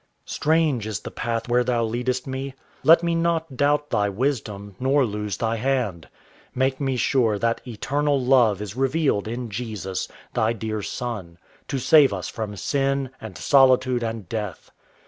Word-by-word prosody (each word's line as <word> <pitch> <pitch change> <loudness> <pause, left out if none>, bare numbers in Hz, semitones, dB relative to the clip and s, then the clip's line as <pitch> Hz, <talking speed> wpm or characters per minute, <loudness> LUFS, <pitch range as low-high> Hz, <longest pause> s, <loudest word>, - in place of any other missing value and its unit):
Strange 155 -8 +1
is 105 -5 -3
the - - -7
path 115 0 -3
where 120 +1 +3
Thou 120 -1 +1
leadest 125 +3 -1
me: 135 0 -5 0.3
Let 165 +2 +6
me 170 0 +1
not 165 -3 0
doubt 145 +2 +1
Thy 105 -3 +2
wisdom, 105 -4 -3
nor 135 +1 +3
lose 105 -2 -3
Thy 115 0 -1
hand. 115 -9 -1 0.5
Make 130 +1 0
me 135 -2 0
sure 120 -4 +2
that 115 +2 0
Eternal 140 +5 0
Love 125 -6 +3
is 105 +1 -7
revealed 135 -5 +1
in 120 0 -4
Jesus, 100 -4 -4 0.3
Thy 110 +1 +1
dear 110 -1 -3
Son, 105 -8 -5 0.3
To 140 - -2
save 135 +2 +5
us - - -5
from 110 -3 -5
sin 135 +3 -1
and - - -8
solitude 130 -2 +4
and 115 -4 -4
death. 105 -5 -5
125 Hz, 160 wpm, -24 LUFS, 110-135 Hz, 0.5 s, Let